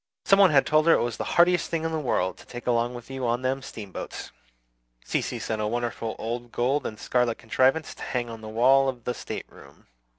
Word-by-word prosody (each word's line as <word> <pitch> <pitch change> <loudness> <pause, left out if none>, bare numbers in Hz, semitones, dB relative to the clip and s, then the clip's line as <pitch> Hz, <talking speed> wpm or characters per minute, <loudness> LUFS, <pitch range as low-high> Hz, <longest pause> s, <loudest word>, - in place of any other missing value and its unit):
Some 195 - +5
one 195 -2 +8
had 140 -4 +4
told 155 +1 +3
her 165 - +8
it - - +3
was 120 -2 -3
the - - -2
"handiest 175 0 +4
thing 165 -2 -2
in 165 - -1
the 160 - -1
world 95 -10 0
to - - -14
take 120 0 -8
along 120 0 +1
with 120 +2 -10
you 130 -2 -3
on 120 +2 0
them 135 +1 0
steamboats." 105 -7 -7 0.7
Cecy - - -1
sent 110 -1 -3
a 105 - 0
wonderful 115 -1 -3
old 120 +1 -5
gold 135 +5 0
and 110 - -7
scarlet 125 -2 +1
contrivance 130 +7 +1
to - - -15
hang 120 -2 -2
on 115 -1 -8
the 110 - -8
wall 135 +5 +4
of 125 -3 -6
the 125 - -2
stateroom. 70 -10 -9
125 Hz, 225 wpm, -26 LUFS, 115-135 Hz, 0.7 s, one